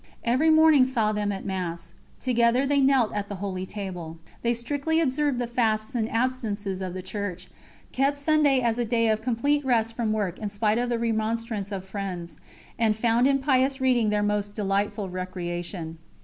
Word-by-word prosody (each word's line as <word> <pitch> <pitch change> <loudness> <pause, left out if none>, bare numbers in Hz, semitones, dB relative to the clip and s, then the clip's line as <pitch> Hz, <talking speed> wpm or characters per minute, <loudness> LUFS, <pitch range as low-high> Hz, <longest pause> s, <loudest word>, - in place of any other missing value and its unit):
Every 260 +7 +3
morning 315 -3 +6
saw 235 -5 +1
them 210 -1 -1
at 195 - -5
Mass; 175 -3 -4 0.3
together 245 +1 +2
they 280 0 +2
knelt 265 -4 +3
at 205 -1 -3
the 205 - -4
Holy 190 -1 -4
Table. 180 -6 -6 0.2
They 235 0 +1
strictly 285 +7 -1
observed 290 -2 +1
the 245 - -1
fasts 225 -1 0
and 225 -2 -1
abstinences 220 -6 -2
of 185 -1 -4
the 185 - -5
Church, 190 -2 -5 0.4
kept 275 +2 +1
Sunday 285 -2 +3
as 235 -1 0
a - - +2
day 230 0 +2
of 215 0 +1
complete 280 +5 +1
rest 230 -3 +1
from 230 -2 -1
work 205 -5 -2
in 210 - -3
spite 210 +2 +1
of 245 0 -1
the 240 - 0
remonstrance 225 -2 -2
of 190 -2 -4
friends, 190 -3 -6 0.4
and 220 -2 +3
found 235 +3 +3
in 275 0 +3
pious 265 0 +1
reading 250 -4 +2
their 210 0 +1
most 205 0 -1
delightful 205 0 -1
recreation. 175 -2 -5
220 Hz, 180 wpm, -26 LUFS, 200-255 Hz, 0.4 s, morning